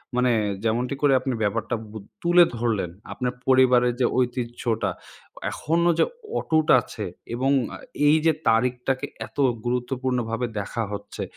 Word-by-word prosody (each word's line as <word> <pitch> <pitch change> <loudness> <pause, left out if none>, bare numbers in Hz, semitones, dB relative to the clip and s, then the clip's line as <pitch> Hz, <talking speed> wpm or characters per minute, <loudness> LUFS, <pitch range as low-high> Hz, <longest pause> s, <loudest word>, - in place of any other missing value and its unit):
মানে 125 0 +3 0.3
যেমনটি 120 +4 0
করে 140 -2 +4
আপনি 130 0 -2
ব্যাপারটা 115 +2 -1 0.2
বু 110 - -7 0.2
তুলে 175 0 +6
ধরলেন। 110 -7 0 0.2
আপনার 125 -1 -2
পরিবারের 125 -2 +5
যে 125 - +3
ঐতিহ্যটা। 120 -2 -1 0.6
এখনও 170 +2 +1
যে - - +5 0.3
অটুট 155 -1 +1
আছে - - -7 0.3
এবং 135 +3 +1 0.2
আ - - -8 0.3
এই 155 +2 +6
যে 160 - +6 0.2
তারিখটাকে 125 +4 +1 0.2
এত - - -27 0.3
গুরুত্বপূর্ণভাবে 125 -1 -1
দেখা 115 +3 -3
হচ্ছে 100 - -6
125 Hz, 130 wpm, -24 LUFS, 120-135 Hz, 0.6 s, তুলে